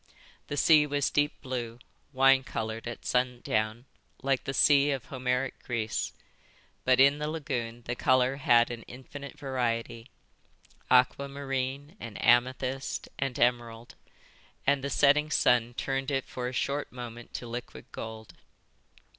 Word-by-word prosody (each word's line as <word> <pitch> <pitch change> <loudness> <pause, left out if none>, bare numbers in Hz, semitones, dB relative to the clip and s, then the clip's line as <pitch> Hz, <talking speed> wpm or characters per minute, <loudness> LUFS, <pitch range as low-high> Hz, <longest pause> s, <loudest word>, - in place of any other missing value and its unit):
The 145 - -4
sea 150 0 +5
was 145 -1 0
deep 145 0 +1
blue, 120 -3 -4 0.3
wine 135 0 +5
coloured 110 -1 -4
at 120 - -7
sundown, 120 -2 0 0.4
like 135 -1 0
the 135 - -2
sea 145 -1 +5
of 135 -3 -2
Homeric 125 0 -2
Greece; 115 -3 -2 0.7
but 130 0 +3
in 140 +2 +6
the 150 - -2
lagoon 125 -7 -4
the 120 - -3
colour 130 +1 +2
had 120 -3 +4
an 120 -1 -6
infinite 140 +3 -10
variety, 120 -3 -2 0.8
aquamarine 140 +3 0
and 115 -3 -8
amethyst 130 +3 +1
and 135 -2 -2
emerald; 120 -1 0 0.7
and 140 -1 +2
the 140 - -2
setting 145 +3 +4
sun 120 -4 +2
turned 135 +1 -2
it 135 -2 -1
for 125 -1 -5
a - - -3
short 140 +3 -2
moment 120 -1 -9
to - - -5
liquid 120 +1 -7
gold. 110 -1 -8
130 Hz, 135 wpm, -29 LUFS, 120-140 Hz, 0.8 s, in